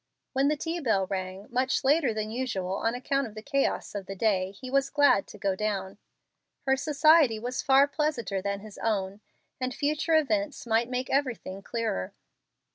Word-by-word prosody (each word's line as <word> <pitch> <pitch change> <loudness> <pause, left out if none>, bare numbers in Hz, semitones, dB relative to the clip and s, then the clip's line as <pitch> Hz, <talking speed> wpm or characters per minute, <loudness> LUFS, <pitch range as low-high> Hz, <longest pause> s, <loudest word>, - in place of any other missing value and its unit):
When 270 +1 +2
the 300 +1 +1
tea 330 +3 -3
bell 220 - +1
rang, 185 +1 -4
much 255 +2 +1
later 280 -1 +3
than 215 0 -3
usual 195 -7 -2
on 225 +3 0
account 275 +1 -1
of 215 - -13
the 215 - -8
chaos 275 +1 -1
of 200 -2 -5
the 195 - -5
day, 190 -3 +1
he 200 +7 -10
was 275 0 +2
glad 285 -9 +4
to - - -11
go 195 -1 0
down. 200 -1 -3 0.7
Her 265 -1 +4
society 295 -2 +4
was 245 +3 -3
far 275 +1 +5
pleasanter 285 -10 -1
than 200 0 -3
his 215 -1 -11
own, 200 -2 -1 0.4
and 255 -1 -2
future 305 +2 +1
events 300 -2 0
might 230 +1 +1
make 255 0 -3
everything 250 -8 -1
clearer. 225 - -3
240 Hz, 180 wpm, -28 LUFS, 200-275 Hz, 0.7 s, far